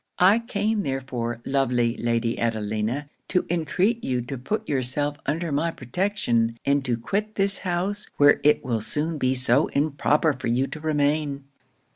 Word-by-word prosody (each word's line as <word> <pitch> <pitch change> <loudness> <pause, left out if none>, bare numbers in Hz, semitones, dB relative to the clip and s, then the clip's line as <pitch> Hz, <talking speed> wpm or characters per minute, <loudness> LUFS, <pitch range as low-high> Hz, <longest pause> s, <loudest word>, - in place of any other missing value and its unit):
I 195 +5 +5
came 220 -2 -1
therefore, 125 - -3
lovely 125 -3 +1
Lady 115 0 -1
Adelina, 110 +4 -1 0.2
to 180 - +1
intreat 185 +7 +1
you 125 -2 -1
to 130 +3 -5
put 215 - -3
yourself 145 +2 -1
under 160 +3 -1
my 150 +4 +1
protection, 125 - -1
and 140 0 +2
to 120 -3 0
quit 205 - -2
this 195 0 0
house, 190 +3 -2
where 145 0 +5
it 150 - +3
will 115 -3 -1
soon 150 +7 -1
be 130 0 +1
so 130 +2 +3
improper 150 +1 +1
for 130 -2 -5
you 120 +3 +2
to 155 - -7
remain." 145 -2 0
145 Hz, 155 wpm, -25 LUFS, 125-175 Hz, 0.2 s, I